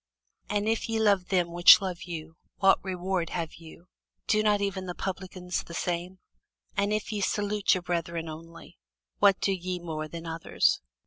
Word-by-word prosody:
For 210 - -2
if 220 +3 0
ye 225 0 0
love 200 -4 +3
them 180 -3 +1
which 175 +3 +9
love 185 -3 -4
you, 160 -2 -7 0.2
what 195 0 +4
reward 185 -2 -2
have 165 -3 -4
ye? 165 0 -13 0.4
do 215 - +3
not 210 -1 +3
even 195 -2 -2
the 180 - -5
publicans 185 -1 -4
the 170 - -10
same? 175 +2 -3 0.6
And 200 0 +1
if 215 +1 -1
ye 210 -2 -2
salute 205 +1 +1
your 185 - -4
brethren 170 -1 -2
only, 165 - -11 0.4
what 200 -2 +5
do 195 - +1
ye 185 0 -3
more 160 -3 -5
than 165 +1 -8
others? 165 0 +1
180 Hz, 175 wpm, -28 LUFS, 170-200 Hz, 0.6 s, which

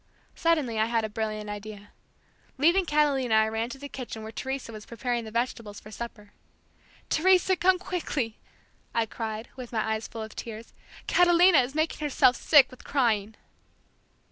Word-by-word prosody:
Suddenly 300 -10 +1
I 220 - +4
had 230 -1 0
a - - -5
brilliant 215 0 -3
idea. 205 0 -8 0.7
Leaving 340 +7 +4
Catalina 280 -6 +2
I 220 0 +4
ran 225 +2 -2
to 255 - -7
the 285 +1 -8
kitchen 245 -5 -7
where 220 - -7
Teresa 265 0 -5
was 215 -1 -10
preparing 235 0 -2
the - - -7
vegetables 230 -2 -3
for 215 - -13
supper. 210 -2 -8 0.8
"Teresa, 370 +2 +4
come 370 +1 +3
quickly," 310 - -3 0.6
I 230 -1 +2
cried 220 +1 -5
with 250 -3 -8
my 220 -1 -1
eyes 220 0 -4
full 225 -1 -7
of 220 - -10
tears; 225 0 -8 0.3
"Catalina 350 -2 +5
is 255 +3 -5
making 315 +1 0
herself 265 -3 +4
sick 280 -5 +5
with 255 - -14
crying." 220 -6 0
235 Hz, 165 wpm, -27 LUFS, 220-290 Hz, 0.8 s, Catalina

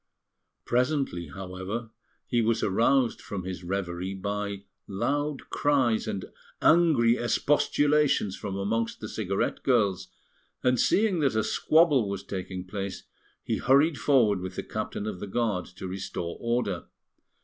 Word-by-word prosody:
Presently, 125 - 0
however, 95 +6 -6 0.3
he 120 -2 +1
was 115 0 +1
aroused 115 +5 +2
from 95 -3 -5
his 95 0 -6
reverie 95 0 -3
by 100 0 -3 0.2
loud 145 +8 -2
cries 130 -6 +2
and 95 - -3 0.3
angry 145 -9 +4
expostulations 145 -2 +2
from 100 -2 -5
amongst 110 +4 -1
the 110 - -6
cigarette 100 -3 -2
girls, 100 -8 +1 0.6
and 125 -1 +3
seeing 200 -4 +3
that 140 -6 +1
a 110 - +2
squabble 145 - +3
was 100 -1 -4
taking 95 -1 -5
place, 100 +1 -5 0.4
he - - -1
hurried 140 +4 +3
forward 115 -9 +3
with 90 0 -6
the - - -3
Captain 105 - -4
of 105 -4 -4
the 105 - -5
Guard 105 -3 -1
to 95 +1 -8
restore 90 -2 -4
order. 115 -7 -1
110 Hz, 135 wpm, -27 LUFS, 95-130 Hz, 0.6 s, angry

